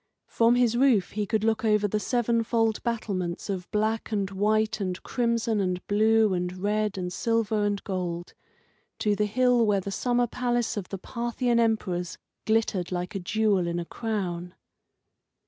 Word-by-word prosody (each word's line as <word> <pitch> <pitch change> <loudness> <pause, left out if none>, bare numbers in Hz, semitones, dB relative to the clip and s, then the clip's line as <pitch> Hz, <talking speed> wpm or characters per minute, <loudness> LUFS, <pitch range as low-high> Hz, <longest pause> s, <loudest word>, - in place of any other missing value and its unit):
From 230 +1 +3
his 245 -2 +3
roof 240 -8 +3
he 210 -1 -2
could 215 0 0
look 225 0 +1
over 210 -1 +3
the 210 +1 -1
seven 235 0 +1
fold 225 -1 +1
battlements 200 -6 -3
of 180 -2 -5
black 220 +2 -1
and 200 -2 -1
white 215 +3 +1
and 185 -2 -2
crimson 230 -3 0
and 180 -2 -1
blue 220 0 +3
and 180 0 -2
red 210 +1 -1
and 180 -1 -3
silver 225 -2 0
and 205 -1 -1
gold, 175 -3 -4 0.6
to 210 -1 +1
the 210 +1 +1
hill 245 +2 +3
where 205 -3 +2
the 195 +1 -5
summer 245 +4 +1
palace 240 0 -1
of 200 -4 -5
the 195 - -4
Parthian 235 +3 -1
emperors 190 -6 0 0.3
glittered 215 -5 +1
like 180 +2 -3
a 195 - -3
jewel 200 -1 +1
in 170 0 -2
a 170 - -3
crown. 180 -5 -4
210 Hz, 165 wpm, -27 LUFS, 190-230 Hz, 0.6 s, From